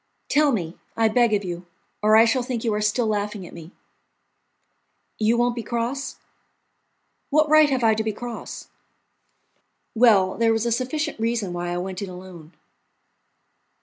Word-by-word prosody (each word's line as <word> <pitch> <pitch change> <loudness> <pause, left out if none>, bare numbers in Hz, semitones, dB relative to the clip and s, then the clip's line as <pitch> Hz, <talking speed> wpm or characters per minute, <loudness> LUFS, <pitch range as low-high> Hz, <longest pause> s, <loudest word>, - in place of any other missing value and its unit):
"Tell 295 -1 +3
me, 175 -8 -3 0.2
I 225 -1 +3
beg 235 +1 +3
of 205 -1 +1
you, 175 0 -6 0.3
or 215 +1 +4
I 225 +1 +7
shall 235 +3 +1
think 245 -2 -4
you 225 -3 0
are 210 - -1
still 210 +3 +1
laughing 210 -2 -2
at - - -12
me." 165 -1 -10 1.5
"You 220 +2 +2
won't 240 0 +2
be 235 - -3
cross?" 235 +5 -3 1.1
"What 305 +1 +3
right 310 0 +6
have 260 -3 0
I 220 -1 +5
to 220 0 -1
be 220 - -1
cross?" 240 +3 -8 1.2
"Well, 215 -5 +4
there 225 -1 +3
was 225 +1 -1
a 235 - 0
sufficient 265 +5 -2
reason 225 -5 -1
why 175 0 -3
I 175 - -2
went 185 +1 -5
in 200 - -5
alone." 180 -3 -11
225 Hz, 165 wpm, -23 LUFS, 195-240 Hz, 1.5 s, I